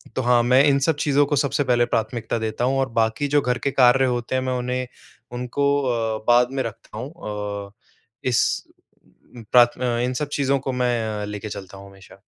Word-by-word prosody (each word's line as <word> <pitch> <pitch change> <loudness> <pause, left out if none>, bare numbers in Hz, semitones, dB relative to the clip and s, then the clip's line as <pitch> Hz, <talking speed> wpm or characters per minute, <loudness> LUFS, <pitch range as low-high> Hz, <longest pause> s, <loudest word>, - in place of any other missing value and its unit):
तो - - 0
हाँ, 120 -1 +3
मैं 130 +3 +5
इन 140 -2 +4
सब 150 +3 +1
चीज़ 145 -1 +1
को 145 - +1
सबसे 140 +1 +1
पहले 120 -2 +2
प्राथमिकता 115 0 -2
देता 110 +1 -3
हूँ 135 +1 +1
और 135 -1 0
बाक़ी 110 +6 0
जो 145 +1 +2
घर 125 -2 0
के - - +1
कार्य 130 0 +4
होते 120 0 -2
हैं 130 - +1
मैं 130 0 -2
उन्हें 125 +1 -3 0.4
उनको 125 +3 -3 0.2
अ, 115 -3 -1
बाद 120 +1 +4
में 135 0 -2
रखता 110 -1 -8
हूँ। 125 +6 -6 0.6
अ, - - -19 0.6
इस 120 - +3 1.1
प्राथ 120 -1 +5 0.2
इन 125 +1 -1
सब 150 - -2
चीज़ों 140 -1 +1
को 135 0 -3
मैं 115 -4 -1
लेके 105 +1 -6
चलता 95 -1 -8
हूँ 100 0 -12
हमेशा। 95 -1 -17
125 Hz, 195 wpm, -22 LUFS, 115-135 Hz, 1.1 s, मैं